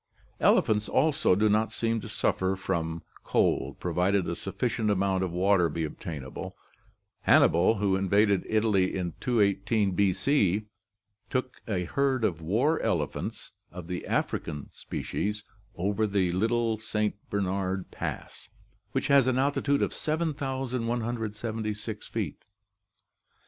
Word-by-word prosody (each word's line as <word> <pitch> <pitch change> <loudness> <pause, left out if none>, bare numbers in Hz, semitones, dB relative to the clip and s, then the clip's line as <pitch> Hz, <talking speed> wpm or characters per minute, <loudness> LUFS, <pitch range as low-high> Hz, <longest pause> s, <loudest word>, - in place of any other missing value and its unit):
Elephants 105 0 +3
also 140 -8 +3
do 105 +3 +3
not 110 +2 +2
seem 115 -1 0
to - - -8
suffer 95 +1 0
from 85 -4 -2 0.2
cold, - - +1
provided 90 +3 +1
a 85 - -2
sufficient 110 +3 -2
amount 95 -1 +1
of 95 - -1
water 90 -1 +3
be 80 +2 -2
obtainable. 75 -3 -6 0.6
Hannibal, 85 +7 +5
who 100 -2 +1
invaded 100 +1 +3
Italy 105 -4 +2
in 90 -3 -3
218 105 -2 +2
B.C., 100 +2 +2 0.6
took 130 -1 -3
a 95 -5 0
herd 135 +5 0
of 85 -6 0
war 120 - +1
elephants - - -2 0.2
of 90 0 -8
the 90 +1 -5
African 75 -3 -2
species 105 +1 -4 0.3
over 100 +4 0
the 95 -3 +1
Little 115 +3 +1
St. 105 -1 -1 0.2
Bernard 95 -1 -2
Pass, - - -6 0.4
which - - 0
has 140 -2 +5
an 130 -1 +2
altitude 140 +1 +2
of - - -1
7176 120 -8 -2
feet. - - -4
105 Hz, 120 wpm, -28 LUFS, 95-115 Hz, 0.6 s, Hannibal